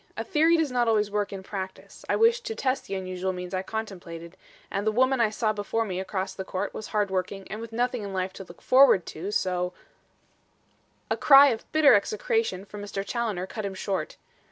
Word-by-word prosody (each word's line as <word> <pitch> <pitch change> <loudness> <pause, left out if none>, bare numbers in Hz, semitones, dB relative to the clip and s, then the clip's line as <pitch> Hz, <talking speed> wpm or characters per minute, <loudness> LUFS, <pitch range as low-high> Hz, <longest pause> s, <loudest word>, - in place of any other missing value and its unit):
A - - -2
theory 330 -1 +3
does 315 -4 0
not 245 -1 +1
always 210 -2 +2
work 205 -1 -1
in 195 -1 -7
practice. 190 -1 -7
I - - +3
wished 465 +2 +3
to 450 - -3
test 260 -6 -1
the 195 - -3
unusual 185 0 -3
means 180 0 -7
I 185 - 0
contemplated, 180 -6 -7 0.4
and 205 +2 -2
the - - +4
woman 260 +2 +2
I 225 - +4
saw 215 0 0
before 215 +2 -1
me 185 -3 -3
across 190 0 -3
the 190 - -5
court 190 +1 -4
was 215 - -6
hard 210 -2 0
working 190 +1 -3
and 215 +2 -5
with 230 0 -8
nothing 245 +1 -1
in 200 -1 -5
life 185 0 -2
to 195 - -8
look 170 -2 -15
forward 255 -9 +6
to, 175 +6 -6
so 180 -3 -1 0.6
" - - -31
A - - +1
cry 280 0 +8
of 225 -3 -4
bitter 310 -2 +6
execration 205 -1 0
from 205 0 -9
Mr. 200 -1 -4
Challoner 215 -7 -2
cut 215 +3 -6
him 195 -1 -4
short. 190 0 -3
205 Hz, 215 wpm, -26 LUFS, 190-235 Hz, 0.6 s, cry